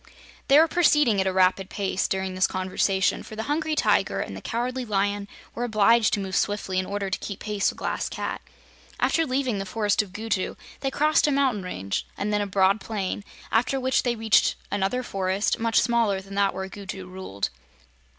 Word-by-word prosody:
They 275 - +6
were 320 +2 +7
proceeding 300 - +3
at 190 - 0
a - - +2
rapid 185 0 +2
pace 195 -1 -1
during 190 -1 -2
this 185 0 +2
conversation, 185 +1 0
for 215 - -10
the 220 - -3
Hungry 310 +4 -1
Tiger - - +2
and - - -4
the - - -8
Cowardly 250 +2 -2
Lion 205 -2 -1 0.3
were 240 - -3
obliged 225 0 +4
to - - -4
move 190 -1 -4
swiftly 205 -3 0
in 185 - -2
order 200 -1 -3
to - - -1
keep 200 - -6
pace 210 -2 -2
with - - -7
the - - -13
Glass - - -2
Cat. - - -4 0.6
After 325 -1 +2
leaving 255 -5 0
the - - -2
Forest 205 +1 +1
of 205 -3 -9
Gugu 210 -2 -2 0.2
they 270 - -1
crossed 305 +2 +3
a - - +2
mountain 270 -7 +1
range, 100 - -4
and 210 +1 -1
then 210 - +2
a 205 - -1
broad 195 +1 +3
plain, 200 -2 -3 0.3
after 255 +4 +2
which 260 0 +2
they 245 -1 0
reached 220 -1 +3 0.2
another 205 +6 0
forest, 195 -1 -1
much 230 0 +3
smaller 230 -5 +2
than 195 +1 -11
that 200 -1 +1
where 190 0 -4
Gugu 195 -1 -7
ruled. 185 - -4
205 Hz, 200 wpm, -25 LUFS, 190-240 Hz, 0.6 s, were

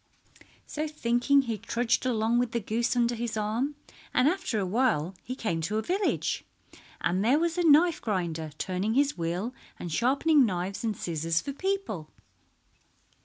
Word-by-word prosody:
So 305 +1 -3
thinking 275 -1 +2
he 225 -4 -3
trudged 235 +3 0
along 230 0 +2
with 245 -2 -1
the 235 - +1
goose 230 +4 -1
under 240 0 +2
his 235 -1 -3
arm, 225 +7 -1 0.4
and 250 +2 +5
after 365 - 0
awhile 195 - +1
he 255 - -6
came 170 -10 -2
to 205 +7 -1
a 220 - -1
village, 385 - 0 0.6
and 185 +3 +1
there 250 +6 +4
was 335 +1 0
a 355 - +1
knife 325 +3 +5
grinder 170 -7 -2
turning 190 +4 -1
his 285 +1 +3
wheel 175 +8 -2 0.2
and 175 - -6
sharpening 275 - +3
knives 190 -2 -2
and 220 -3 -1
scissors 165 0 -1
for 280 +7 -5
people. 375 - -3
235 Hz, 160 wpm, -28 LUFS, 190-275 Hz, 0.6 s, and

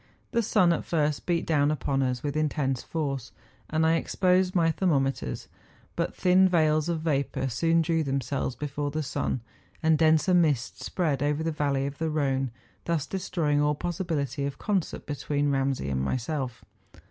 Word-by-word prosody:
The 235 - +2
sun 180 -5 +3
at - - -2
first 150 -3 -1
beat 170 -2 +1
down 145 -3 +2
upon 140 -2 0
us 125 -2 -1
with 145 -1 -2
intense 145 -4 0
force; 135 -6 -3 0.4
and 160 +1 +1
I 165 +1 +4
exposed 185 +1 +1
my 165 -2 +4
thermometers; 135 - 0 0.5
but - - -2
thin 185 +1 +4
veils 155 -2 +2
of 165 -2 -1
vapour 140 -4 -1
soon 165 +7 +2
drew 165 0 +1
themselves 135 -2 -2
before 145 0 -3
the 155 +2 -2
sun, 130 -2 -2 0.4
and 160 -1 +4
denser 160 +2 +4
mists 150 -8 +1
spread 155 -7 0
over 145 +2 0
the 165 - 0
valley 140 -3 0
of 140 0 -5
the 160 0 0
Rhone, 135 -4 0 0.4
thus 165 -4 0
destroying 165 -5 0
all 150 0 +2
possibility 155 - -2
of 140 - -6
concert 200 -6 -2
between 145 0 -1
Ramsay 135 - 0
and 65 -1 0
myself. 125 - -3
150 Hz, 165 wpm, -27 LUFS, 135-165 Hz, 0.5 s, I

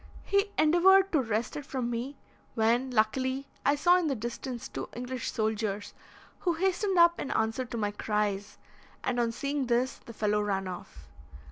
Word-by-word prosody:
He 400 +1 +1
endeavoured 375 +5 +5
to 305 - +3
wrest 225 -1 -2
it 295 - -4
from 255 -3 -3
me, 250 +4 -4 0.4
when, 235 +3 +2
luckily, 260 +4 +1 0.2
I 285 - +3
saw 350 +5 +5
in 345 - 0
the 275 - 0
distance 235 +2 -5
two - - -6
English 250 +1 -4
soldiers, 215 -2 -2 0.5
who 350 - +1
hastened 380 +2 0
up 340 0 +6
in - - -3
answer 225 +3 0
to 235 - -6
my 205 -2 0
cries, 205 -1 -2 0.5
and, 245 -1 0
on 235 -1 +1
seeing 280 +2 -2
this, 245 +2 +1
the 230 - -12
fellow 210 -1 +1
ran 195 -2 -1
off. 75 - -9
245 Hz, 170 wpm, -29 LUFS, 215-290 Hz, 0.5 s, up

